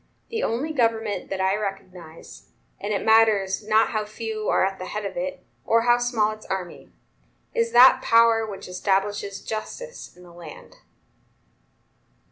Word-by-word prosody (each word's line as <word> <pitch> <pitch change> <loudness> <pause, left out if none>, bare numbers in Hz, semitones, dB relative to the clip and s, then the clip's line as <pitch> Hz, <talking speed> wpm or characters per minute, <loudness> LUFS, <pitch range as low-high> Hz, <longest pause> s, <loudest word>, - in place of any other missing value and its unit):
The 455 - -2
only 270 +8 -2
government 225 -5 -1
that 195 - -4
I 190 +1 +1
recognize, 185 -5 -8 0.3
and 205 +2 -4
it 205 - -2
matters 215 -3 +3
not 215 +1 +3
how 215 -1 -2
few 215 0 -5
are - - +3
at 195 0 -4
the 185 - -6
head 210 0 -5
of 195 - -5
it, 180 +1 -5 0.2
or 230 +8 +2
how 240 0 +4
small 235 -3 +1
its 215 0 -11
army, 185 -2 -6 0.6
is 465 -1 0
that 260 +1 +7
power 230 -1 +4
which 205 -3 -7
establishes 195 +2 -2
justice 480 - -7
in 180 - -15
the 175 -1 -15
land." 170 -3 -12
215 Hz, 155 wpm, -24 LUFS, 195-230 Hz, 0.6 s, that